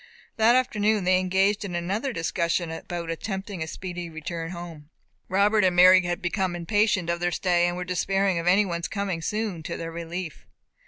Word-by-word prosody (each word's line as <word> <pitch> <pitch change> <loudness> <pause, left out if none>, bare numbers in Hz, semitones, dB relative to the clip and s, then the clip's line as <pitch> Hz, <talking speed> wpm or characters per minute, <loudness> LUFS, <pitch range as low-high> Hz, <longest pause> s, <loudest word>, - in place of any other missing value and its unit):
That 225 +2 +5
afternoon 215 -5 +1
they 185 0 +3
engaged 190 +3 +1
in 185 -4 -5
another 195 +10 -2
discussion 170 -3 -1
about 170 0 -5
attempting 190 +1 -5
a 160 - -2
speedy 175 +1 -6
return 165 +1 -5
home. 170 -4 -9 0.4
Robert 205 +2 +3
and 185 -1 +3
Mary 185 +1 +8
had 175 0 -3
become 180 0 -1
impatient 205 +1 +1
of 170 0 -1
their 175 0 +1
stay, 175 -1 +2
and 175 0 -2
were 180 - -4
despairing 195 +1 0
of 170 - -4
any 195 +4 +5
one's 170 -2 -3
coming 200 -5 -3
soon 210 -1 -2
to - - -5
their 165 0 -5
relief. 170 0 -6
180 Hz, 180 wpm, -25 LUFS, 170-200 Hz, 0.4 s, Mary